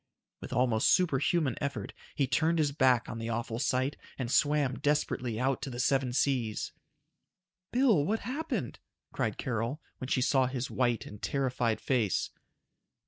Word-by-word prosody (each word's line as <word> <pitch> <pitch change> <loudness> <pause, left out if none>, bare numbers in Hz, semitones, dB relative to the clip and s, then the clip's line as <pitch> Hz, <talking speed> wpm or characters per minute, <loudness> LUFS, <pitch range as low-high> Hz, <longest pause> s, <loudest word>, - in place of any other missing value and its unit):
With - - -9
almost 125 -3 +2
superhuman 160 -4 +2
effort, 135 -8 -3 0.2
he 140 - +2
turned 155 +7 +1
his 150 -3 +2
back 130 -4 +3
on 115 - -5
the 115 0 -4
awful 115 0 -2
sight 130 +1 0 0.2
and 125 -2 -3
swam 145 -3 +2
desperately 130 -6 0
out 130 +1 0
to - - -4
the 120 -1 -6
Seven 135 0 +2
Seas. 125 -4 0 1.0
"Bill, 240 - +4
what's 215 +8 -1
happened?" 300 +6 -3 0.3
cried - - -1
Carol, 120 +2 -2 0.2
when 130 - -5
she 130 -1 +1
saw 130 -1 +3
his 130 0 -3
white 120 -3 +1
and 105 - -10
terrified 125 -4 0
face. 115 -8 0
130 Hz, 150 wpm, -30 LUFS, 120-145 Hz, 1.0 s, Bill